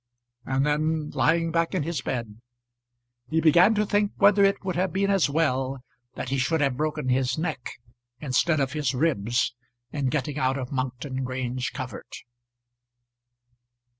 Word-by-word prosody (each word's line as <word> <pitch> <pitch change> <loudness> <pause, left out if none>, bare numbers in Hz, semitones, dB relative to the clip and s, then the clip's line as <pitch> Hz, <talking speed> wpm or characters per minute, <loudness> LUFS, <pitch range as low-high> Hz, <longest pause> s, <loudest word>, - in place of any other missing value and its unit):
And 135 +1 +1
then, 155 +1 0
lying 165 0 +2
back 165 +3 0
in 175 - 0
his 165 0 -3
bed, 115 -3 -4 0.9
he 160 - +1
began 170 +7 +5
to 210 0 +2
think 205 0 +1
whether 200 0 +5
it 195 -1 +2
would 185 -2 -2
have 185 +1 0
been 195 +3 +1
as 195 -7 +3
well 135 -4 0 0.3
that 130 - -5
he 135 0 0
should 160 +5 +1
have 140 -3 +1
broken 150 -1 -2
his 130 0 +1
neck 155 -6 -3 0.5
instead 150 +3 +1
of 135 0 0
his 145 -3 -1
ribs 125 -5 +1 0.4
in 145 -3 -1
getting 150 +1 -2
out 130 +1 +1
of 125 -2 -5
Monkton 130 0 -3
Grange 130 0 -3
covert. 130 -1 -7
145 Hz, 155 wpm, -26 LUFS, 130-165 Hz, 0.9 s, began